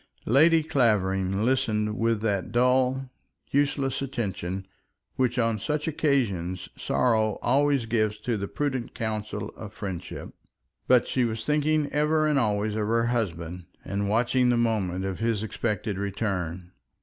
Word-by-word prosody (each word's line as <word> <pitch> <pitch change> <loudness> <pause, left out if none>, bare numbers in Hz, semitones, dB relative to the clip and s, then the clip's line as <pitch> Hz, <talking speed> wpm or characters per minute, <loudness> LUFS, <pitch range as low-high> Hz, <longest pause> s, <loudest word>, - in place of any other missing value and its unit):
Lady 160 +6 +5
Clavering 100 -7 +1
listened 105 -4 +1
with 115 -1 +1
that 100 -4 -1
dull, 125 +2 +2 0.4
useless 140 -1 +1
attention 95 -8 -3 0.5
which 125 -1 +1
on 115 -2 +1
such 150 +8 -2
occasions 100 - 0
sorrow 110 -4 +1
always 140 0 +3
gives 110 -2 0
to 115 +2 -2
the 100 -1 -3
prudent 130 -3 -3
counsels 110 -1 -3
of 105 -2 -8
friendship; 95 -4 -6 0.5
but 125 -2 +5
she 130 - +1
was 115 -1 -2
thinking 150 0 +2
ever 155 +1 +2
and 150 -2 +3
always 105 -2 0
of 105 -1 -1
her 115 +1 +2
husband, 90 -7 -2 0.2
and 100 +1 -2
watching 125 +3 +2
the 120 - +3
moment 100 -6 0
of 95 -1 -3
his 115 -2 0
expected 105 -2 -2
return. 95 -4 -3
115 Hz, 135 wpm, -26 LUFS, 100-130 Hz, 0.5 s, Lady